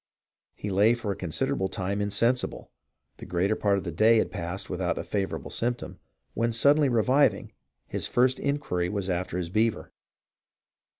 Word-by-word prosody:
He 105 Hz, -, -5 dB
lay 105 Hz, +5 st, +4 dB
for 115 Hz, -4 st, -4 dB
a -, -, -3 dB
considerable 95 Hz, +1 st, -1 dB
time 100 Hz, +1 st, -2 dB
insensible; 115 Hz, +5 st, 0 dB, 0.5 s
the -, -, -10 dB
greater 95 Hz, +5 st, +1 dB
part 100 Hz, -2 st, +1 dB
of 95 Hz, -, -3 dB
the 85 Hz, -, -4 dB
day 110 Hz, +8 st, +4 dB
had -, -, +1 dB
passed 90 Hz, 0 st, -5 dB
without 90 Hz, -1 st, -2 dB
a -, -, -3 dB
favourable 100 Hz, -2 st, -3 dB
symptom; 120 Hz, +1 st, -3 dB, 0.3 s
when, 115 Hz, +1 st, 0 dB
suddenly 140 Hz, +5 st, +4 dB
reviving, 130 Hz, +4 st, +2 dB, 0.4 s
his -, -, -2 dB
first 130 Hz, +1 st, +2 dB
inquiry 140 Hz, -12 st, -1 dB
was 100 Hz, -1 st, -2 dB
after 90 Hz, 0 st, -2 dB
his 90 Hz, -2 st, -3 dB
beaver. 110 Hz, +4 st, 0 dB
100 Hz, 160 wpm, -27 LUFS, 95-120 Hz, 0.5 s, lay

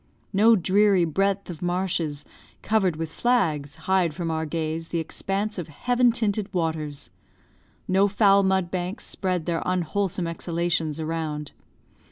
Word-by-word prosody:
No 220 Hz, +4 st, +6 dB
dreary 195 Hz, -1 st, +3 dB
breadth 195 Hz, +5 st, 0 dB
of 165 Hz, -, -10 dB
marshes, 175 Hz, -5 st, -1 dB, 0.4 s
covered 195 Hz, -6 st, +2 dB
with 160 Hz, 0 st, -5 dB
flags, 160 Hz, -, +1 dB
hide 185 Hz, -5 st, +2 dB
from 170 Hz, -2 st, -2 dB
our 160 Hz, 0 st, -2 dB
gaze 160 Hz, +1 st, -3 dB
the 170 Hz, -, -3 dB
expanse 195 Hz, +5 st, -2 dB
of 170 Hz, -, -5 dB
heaven 245 Hz, -, +2 dB
tinted 215 Hz, -3 st, -1 dB
waters; 160 Hz, -5 st, -3 dB, 0.8 s
no 190 Hz, +2 st, +4 dB
foul 200 Hz, -1 st, +4 dB
mud 190 Hz, -2 st, +1 dB
banks 185 Hz, +3 st, -3 dB
spread 185 Hz, -4 st, -2 dB
their 170 Hz, -1 st, -1 dB
unwholesome 185 Hz, +1 st, -1 dB
exhalations 165 Hz, -2 st, -1 dB
around. 155 Hz, -2 st, -3 dB
175 Hz, 135 wpm, -25 LUFS, 160-195 Hz, 0.8 s, No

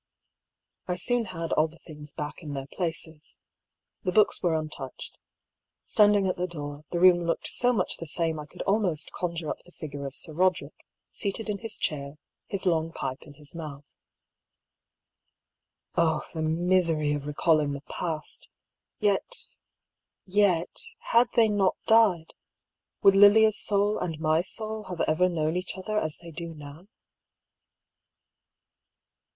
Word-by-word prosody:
I 180 Hz, -, 0 dB
soon 240 Hz, +5 st, +1 dB
had 165 Hz, -4 st, -5 dB
all 155 Hz, -, +3 dB
the 165 Hz, +1 st, -17 dB
things 150 Hz, -3 st, -6 dB
jpack 150 Hz, 0 st, -5 dB
in 150 Hz, -4 st, -6 dB
their 135 Hz, -1 st, -4 dB
places. 160 Hz, -1 st, -4 dB, 0.6 s
The 185 Hz, -, -1 dB
books 210 Hz, +2 st, +4 dB
were 170 Hz, -2 st, +2 dB
untouched. 155 Hz, -4 st, -5 dB, 0.7 s
Standing 205 Hz, -2 st, +4 dB
at 185 Hz, -, 0 dB
the 180 Hz, +1 st, -1 dB
door, 145 Hz, -3 st, -7 dB
the 175 Hz, -, -2 dB
room 180 Hz, -1 st, +7 dB
looked 170 Hz, -1 st, -2 dB
so 245 Hz, +1 st, +3 dB
much 205 Hz, -7 st, -1 dB
the 165 Hz, -, -7 dB
same 160 Hz, 0 st, 0 dB
I 150 Hz, -, -8 dB
could -, -, -7 dB
almost 195 Hz, -6 st, 0 dB
conjure 170 Hz, -3 st, -3 dB
up -, -, -5 dB
the 175 Hz, -, -19 dB
figure 140 Hz, -4 st, -6 dB
of 135 Hz, -, -8 dB
Sir 155 Hz, -, -3 dB
Roderick, 175 Hz, -4 st, 0 dB, 0.2 s
seated 210 Hz, +2 st, -2 dB
in 200 Hz, -, -4 dB
his 225 Hz, 0 st, -1 dB
chair, 140 Hz, -1 st, -3 dB, 0.3 s
his 195 Hz, -1 st, -3 dB
long 165 Hz, -2 st, +1 dB
pipe 130 Hz, -4 st, -4 dB
in 145 Hz, -2 st, -14 dB
his 145 Hz, 0 st, -9 dB
mouth. 150 Hz, -4 st, -7 dB, 2.1 s
Oh 160 Hz, -2 st, +3 dB
the 160 Hz, -, -3 dB
misery 165 Hz, -2 st, +2 dB
of 145 Hz, -1 st, -4 dB
recalling 150 Hz, -1 st, +2 dB
the 140 Hz, -, -6 dB
past! 160 Hz, 0 st, -4 dB, 0.5 s
Yet, 210 Hz, -, 0 dB, 0.8 s
yet, 185 Hz, -3 st, +2 dB, 0.2 s
had 235 Hz, +1 st, +3 dB
they 230 Hz, -2 st, +6 dB
not 205 Hz, -3 st, +2 dB
died, 215 Hz, -8 st, +4 dB, 0.7 s
would 195 Hz, -1 st, +8 dB
Lilia's 210 Hz, +2 st, +6 dB
soul 205 Hz, +1 st, +2 dB
and 160 Hz, -3 st, -3 dB
my 155 Hz, 0 st, +2 dB
soul 215 Hz, +3 st, -4 dB
have 180 Hz, -3 st, -4 dB
ever 180 Hz, +4 st, +3 dB
known 160 Hz, -1 st, -1 dB
each 180 Hz, +1 st, -3 dB
other 210 Hz, +3 st, -1 dB
as 155 Hz, -4 st, -3 dB
they 170 Hz, -1 st, -11 dB
do 165 Hz, +1 st, -6 dB
now 150 Hz, +5 st, -11 dB
170 Hz, 150 wpm, -27 LUFS, 155-195 Hz, 2.1 s, would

